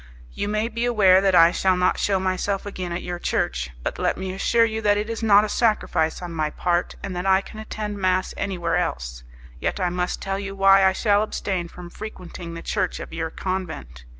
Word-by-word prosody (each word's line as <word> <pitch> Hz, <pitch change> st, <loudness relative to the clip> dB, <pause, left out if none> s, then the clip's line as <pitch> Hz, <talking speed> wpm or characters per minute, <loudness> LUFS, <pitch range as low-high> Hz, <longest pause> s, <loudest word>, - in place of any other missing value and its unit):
"You 205 Hz, -, -3 dB
may 215 Hz, +2 st, 0 dB
be 235 Hz, 0 st, -3 dB
aware 195 Hz, -6 st, +5 dB
that 195 Hz, -2 st, +3 dB
I 165 Hz, 0 st, +7 dB
shall 185 Hz, 0 st, +2 dB
not 180 Hz, 0 st, +2 dB
shew 195 Hz, -2 st, +1 dB
myself 190 Hz, +2 st, -1 dB
again 185 Hz, -3 st, -5 dB
at 170 Hz, +1 st, -3 dB
your 175 Hz, 0 st, -4 dB
church; 60 Hz, -, -1 dB
but -, -, -3 dB
let -, -, 0 dB
me 190 Hz, 0 st, -4 dB
assure 230 Hz, +4 st, +3 dB
you 220 Hz, 0 st, -3 dB
that 205 Hz, -1 st, +3 dB
it 215 Hz, +2 st, -2 dB
is 230 Hz, -, -4 dB
not 210 Hz, -2 st, +6 dB
a -, -, -1 dB
sacrifice 205 Hz, -8 st, +1 dB
on 175 Hz, -1 st, -6 dB
my 155 Hz, -2 st, -1 dB
part, 175 Hz, +3 st, -1 dB
and 195 Hz, -2 st, -4 dB
that 180 Hz, +2 st, -2 dB
I 190 Hz, 0 st, +5 dB
can 215 Hz, -, -11 dB
attend 210 Hz, -1 st, -5 dB
mass 185 Hz, 0 st, +1 dB
anywhere 170 Hz, -4 st, -1 dB
else. 60 Hz, -, -3 dB, 0.4 s
Yet -, -, -2 dB
I 180 Hz, -2 st, +1 dB
must 180 Hz, 0 st, -2 dB
tell 195 Hz, 0 st, -3 dB
you 195 Hz, 0 st, -5 dB
why 195 Hz, 0 st, +6 dB
I 190 Hz, 0 st, +5 dB
shall 205 Hz, +1 st, +2 dB
abstain 190 Hz, -4 st, -2 dB
from 175 Hz, 0 st, -11 dB
frequenting 180 Hz, -5 st, -8 dB
the 165 Hz, -, -7 dB
church 190 Hz, -4 st, -1 dB
of -, -, -8 dB
your 160 Hz, 0 st, -2 dB
convent. 160 Hz, -, -5 dB
190 Hz, 220 wpm, -23 LUFS, 175-205 Hz, 0.4 s, I